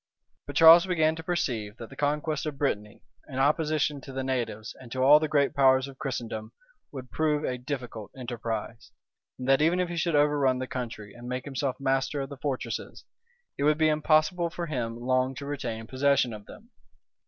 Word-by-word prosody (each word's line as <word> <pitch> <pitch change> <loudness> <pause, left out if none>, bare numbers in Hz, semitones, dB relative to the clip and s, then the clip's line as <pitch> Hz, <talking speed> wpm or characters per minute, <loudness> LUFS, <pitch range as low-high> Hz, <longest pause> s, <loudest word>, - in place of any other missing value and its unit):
But 145 - -7
Charles 165 +3 +8
began 160 -3 +2
to 160 - -7
perceive 120 -11 -2
that 115 - -9
the - - -10
conquest 150 +1 -1
of 145 -2 -5
Brittany, 105 -8 -2 0.3
in 130 - -6
opposition 150 0 +1
to 135 - -10
the 135 0 -3
natives, 120 -4 -3
and 120 -2 -12
to 130 +1 -1
all 145 +3 +8
the 155 - -1
great 145 -2 +2
powers 130 -1 +4
of 135 -1 -12
Christendom, 115 -6 -4 0.4
would 130 -3 -9
prove 155 -1 0
a 125 -1 -2
difficult 125 -5 -6
enterprise; 115 -3 -5 0.5
and 125 - -6
that 135 +1 +4
even 165 +4 +3
if 180 -1 0
he 175 - -4
should 165 -1 0
overrun 145 -3 +3
the 130 - -3
country 115 -5 -6
and 120 +1 -9
make 125 0 -3
himself 135 -1 -3
master 135 +1 0
of 135 0 -4
the 140 - -8
fortresses, 135 -2 -4 0.5
it - - 0
would 150 +1 +3
be 155 0 +3
impossible 155 +3 +2
for 170 +1 -5
him 120 -7 -3
long 130 +1 0
to 140 - -7
retain 120 -6 -4
possession 130 -1 +2
of 105 -1 -10
them. 230 +4 -14
135 Hz, 195 wpm, -27 LUFS, 125-150 Hz, 0.5 s, Charles